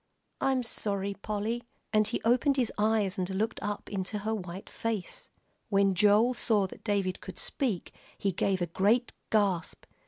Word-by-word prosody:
I'm 265 -2 +2
sorry, 200 -3 -2
Polly," 215 +3 -2 0.3
and 215 -1 +4
he 225 - -3
opened 255 +4 +4
his 245 -4 +2
eyes 210 -2 +1
and 180 0 -1
looked 215 +4 -1
up 205 0 -3
into 200 +1 -3
her 215 +2 -2
white 190 -2 -5
face. 225 -5 -3 0.4
When 195 -1 +4
Joel 210 +6 +5
saw 215 -5 +2
that 190 - -10
David 200 -3 0
could - - -8
speak, 235 - -1 0.2
he 200 - 0
gave 190 0 +1
a - - +2
great 205 +8 +2 0.2
gasp. 195 -6 +1
205 Hz, 160 wpm, -30 LUFS, 195-225 Hz, 0.4 s, Joel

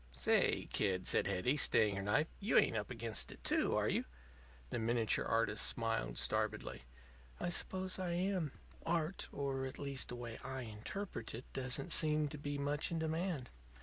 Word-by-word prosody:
"Say, 60 -1 +2
kid," 95 -3 +1
said - - +3
Hetty, 125 +11 +1
staying 105 -7 +5
her - - -1
knife, 105 +10 +2
"you 205 +3 +2
ain't - - +5
up 105 -1 -2
against 115 -2 -1
it, - - -13
too, - - +2
are - - +2
you?" - - +1 0.7
The - - -1
miniature 115 -1 +2
artist 115 - +1
smiled - - -1
starvedly. - - -1 0.5
"I 175 - -1
suppose 185 +1 -1
I 180 -2 -1
am. 180 -4 0 0.3
Art 165 +2 -1
or, 135 -1 -2
at 130 - -8
least, 140 -2 -2
the 125 - -4
way 120 -2 -6
I 130 0 -4
interpret 115 - -5
it 120 - -8
doesn't 130 +6 -1
seem 150 -2 +4
to 150 - -7
be 145 0 -3
much 145 +1 0
in 170 - -2
demand. 160 -4 -2
135 Hz, 175 wpm, -37 LUFS, 115-160 Hz, 0.7 s, staying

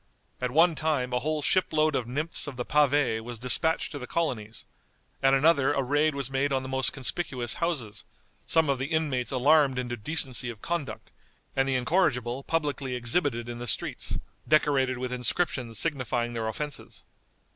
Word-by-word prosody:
At 125 - 0
one 165 +6 +4
time 150 -5 -1
a 125 - +2
whole 155 +2 -2
ship 185 +4 +2
load 155 -1 +2
of 120 -3 -1
nymphs 150 +6 -1
of 140 - -6
the 125 0 -4
pavé 145 -5 +2
was 120 0 -7
dispatched 130 +7 +3
to 145 - -6
the 125 - -7
colonies; 120 -10 -3 0.6
at 135 0 +4
another 145 -1 +3
a 140 - 0
raid 145 +3 +1
was 135 -1 -3
made 135 +1 0
on 130 -1 0
the - - -6
most 130 0 +1
conspicuous 130 -3 -2
houses, 145 -12 -2 0.4
some 160 -1 +3
of 140 -2 0
the 130 - -2
inmates 150 -6 -1
alarmed 140 +1 +4
into 120 -1 -2
decency 125 0 -2
of 115 -3 -8
conduct, 145 -6 -4 0.4
and 135 0 +1
the 135 - +1
incorrigible 125 -3 +1
publicly 140 -4 -2
exhibited 120 -1 0
in 120 0 -6
the 120 - -5
streets, 100 - -2 0.3
decorated 140 -4 +2
with 125 0 -4
inscriptions 125 -2 0
signifying 120 -4 0
their 115 -1 -2
offenses. 145 +6 -6
135 Hz, 175 wpm, -27 LUFS, 125-150 Hz, 0.6 s, one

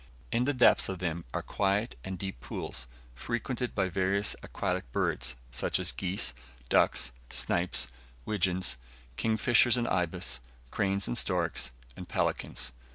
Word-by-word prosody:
In 120 +2 +2
the 145 - +2
depths 125 - +5
of 95 - -2
them 85 -2 -2
are - - -2
quiet 100 +4 0
and 95 0 -4
deep 95 -7 -5
pools, 60 -1 -4 0.3
frequented 120 - -3
by 95 -2 +2
various 95 +2 +1
aquatic 60 - -2
birds, 60 +1 0 0.2
such 65 - +1
as - - +3
geese, 95 +1 -1 0.4
ducks, - - +4 0.2
snipes, 85 +1 +1 0.4
widgeons, 90 -9 +1 0.4
kingfishers 115 - +4
and 120 -1 0
ibis, 80 -8 -1 0.3
cranes 100 -1 +1
and - - +2
storks, - - 0 0.3
and - - -9
pelicans. - - -1
95 Hz, 135 wpm, -30 LUFS, 85-110 Hz, 0.4 s, depths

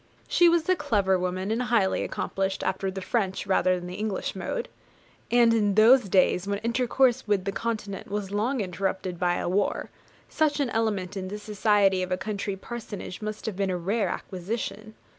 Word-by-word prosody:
She 345 -1 +5
was 335 -1 +2
a 370 - +4
clever 205 - +1
woman, 185 +2 -2
and 230 +2 0
highly 235 -6 +2
accomplished, 195 0 -2
after 190 +1 -1
the 190 0 -5
French 195 -5 -1
rather 185 -1 +3
than 175 - -7
the 180 - -6
English 210 0 -3
mode; - - -3 0.6
and 235 -1 +5
in 205 -3 +2
those 225 0 +6
days, 185 0 +3
when 200 0 0
intercourse 245 +1 +2
with 200 -3 +1
the 195 - 0
Continent 210 -2 -4
was 200 -1 -3
long 225 +5 0
interrupted 190 -1 -3
by 175 -1 +1
war, 195 +3 0 0.4
such 305 -2 +1
an 270 -5 0
element 205 -4 -1
in 190 -1 -4
the 205 +2 -5
society 205 -2 +2
of 185 0 -3
a 185 - +1
country 200 0 -3
parsonage 210 -2 -7
must 215 0 -5
have 220 - -3
been 195 0 0
a 180 - -1
rare 200 +5 0
acquisition. 215 +3 -5
205 Hz, 180 wpm, -26 LUFS, 190-230 Hz, 0.6 s, those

